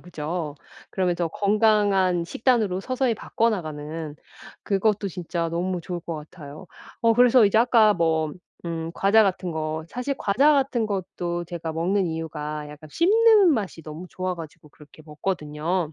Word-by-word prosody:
그죠? 160 -2 -5 0.4
그러면서 175 -3 0
건강한 200 -3 +2
식단으로 215 -2 +1
서서히 255 0 0
바꿔나가는 160 -9 -3 0.5
그것도 200 0 0
진짜 170 -1 -3
너무 175 +2 -2
좋을 175 +1 -5
것 165 -1 -6
같아요. 150 +2 -10 0.4
어 230 0 +5
그래서 245 0 +6
이제 200 - +1
아까 225 -3 +5
뭐 160 -3 0 0.3
음 165 0 -4
과자 215 +2 +4
같은 185 -2 -1
거, 155 0 -3
사실 250 +6 -3
과자 275 +10 +3
같은 265 -5 +1
것도 175 -3 -3
제가 165 -2 -5
먹는 180 +4 0
이유가 155 -2 -5
약간 150 +1 -12
씹는 420 -1 +5
맛이 200 -8 -3
너무 155 +4 -8
좋아 185 -1 -4
가지고 155 -2 -11
그렇게 150 +1 -17
먹거든요. 155 +1 -3
180 Hz, 315 characters per minute, -24 LUFS, 160-215 Hz, 0.5 s, 그래서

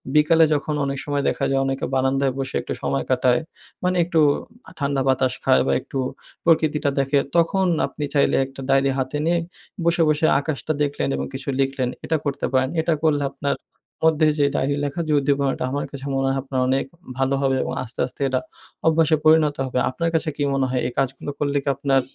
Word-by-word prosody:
বিকালে 160 +2 +5
যখন 150 +1 -1
অনেক 140 0 -2
সময় 145 -1 -1
দেখা 135 - -1
যায় 135 - +2
অনেকে 135 0 -2
বারান্দায় 135 0 +1
বসে 135 -1 -3
একটু - - -5
সময় 70 0 0
কাটায়। 125 0 +3 0.4
মানে 180 0 +1
একটু 170 -2 +1 0.6
ঠান্ডা 140 -1 0
বাতাস 130 -1 +2
খায় - - +4
বা 70 - +2
একটু 135 - -5 0.5
প্রকৃতিটা 155 -3 +2
দেখে 140 +1 +2 0.2
তখন 185 +3 +2 0.2
আপনি 150 - -5
চাইলে 140 - +3
একটা 135 0 -10
ডায়েরি 135 0 +3
হাতে 130 +3 -2
নিয়ে 170 +1 +2 0.5
বসে, 170 0 +3
বসে 155 +1 +2
আকাশটা 155 +1 -2
দেখলেন 140 - -1
এবং 70 0 -2
কিছু 135 +1 -7
লিখলেন। 135 -2 0 0.2
এটা 160 - +1
করতে 140 -1 -1
পারেন। 130 0 +2
এটা 165 +1 +1
করলে 145 -2 +2
আপনার 140 0 -2 0.5
মধ্যে 160 -1 +4
যে 145 - +4
ডায়েরি 140 +2 +1
লেখার 145 +4 -2
যে - - +3
উদ্দীপনাটা 140 -1 0
আমার 145 +1 -2
কাছে 140 -1 -7
মনে 135 0 +1
হয় 135 - 0
আপনার 135 -1 -3
অনেক 135 +1 +1 0.3
ভালো 135 +1 +1
হবে 135 -1 +2
এবং - - -4
আস্তে, 120 -1 -11
আস্তে 130 - -13
এটা 130 -1 +1 0.5
অভ্যাসে 160 -1 +4
পরিণত 155 -2 +5
হবে। 130 -1 -1
আপনার 165 +6 -1
কাছে 160 0 +1
কি 145 - 0
মনে 135 -1 +1
হয় 125 0 0
এই - - -4
কাজগুলো 135 +2 -2
করলে 145 -1 0
কি 140 - -1
আপনার 135 0 +2
140 Hz, 195 wpm, -22 LUFS, 135-150 Hz, 0.6 s, বিকালে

